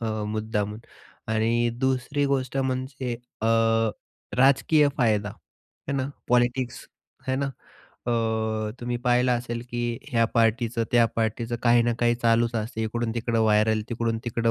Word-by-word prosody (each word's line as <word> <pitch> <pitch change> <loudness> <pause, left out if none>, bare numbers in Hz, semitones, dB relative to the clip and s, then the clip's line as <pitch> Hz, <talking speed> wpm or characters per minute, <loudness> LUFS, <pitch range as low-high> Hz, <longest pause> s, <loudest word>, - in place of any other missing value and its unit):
अ, 110 -2 -2
मुद्दामून 105 -1 -2 0.5
आणि 115 +2 +2
दुसरी 130 +2 0
गोष्ट 135 -1 -1
म्हणजे 130 -1 -2 0.3
अ, - - +2 0.9
राजकीय 140 +3 +5
फायदा 105 -5 +2
आहे 135 - -12
न 130 0 -1 0.2
पॉलिटिक्स 125 0 +1 0.4
आहे 130 - +1
न. 140 - 0
अ, 130 -2 -8 0.7
तुम्ही 120 0 -2
पाहिलं 125 +1 +3
असेल 120 -1 -3
की 120 -1 -2
ह्या 115 -3 +3
पार्टीचं 115 0 +2
त्या 120 -1 +5
पार्टीचं 115 +1 -1
काही 120 0 +5
ना 120 0 +1
काही 120 0 +3
चालूच 115 0 +2
असते, 110 +1 -3
इकडून-तिकडं 115 0 -1
व्हायरल, 110 0 +3
तिकडून-तिकडं 115 0 -1
120 Hz, 130 wpm, -25 LUFS, 115-125 Hz, 0.9 s, राजकीय